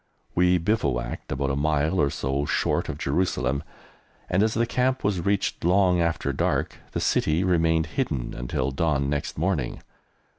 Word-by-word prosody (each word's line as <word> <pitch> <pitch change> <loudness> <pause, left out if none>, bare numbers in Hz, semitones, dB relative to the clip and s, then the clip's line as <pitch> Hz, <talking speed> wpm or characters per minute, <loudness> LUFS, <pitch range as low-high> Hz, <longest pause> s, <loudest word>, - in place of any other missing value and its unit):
We 90 +1 +4
bivouacked 80 - -1
about 70 0 -1
a - - 0
mile 75 +3 +1
or 70 - +3
so 70 +1 -1
short - - 0
of - - -4
Jerusalem, 70 -3 0 0.7
and, 90 +2 +3
as 110 0 +2
the 115 +1 +2
camp 130 +2 0
was 95 -4 0
reached 100 0 0
long 90 0 +3
after 85 -1 0
dark, - - -1
the - - -1
City 80 +4 +1
remained 80 -3 +2
hidden 75 - -2
until 65 +2 -2
dawn 70 -1 0
next 75 0 -3
morning. 80 -6 -1
80 Hz, 155 wpm, -25 LUFS, 70-95 Hz, 0.7 s, We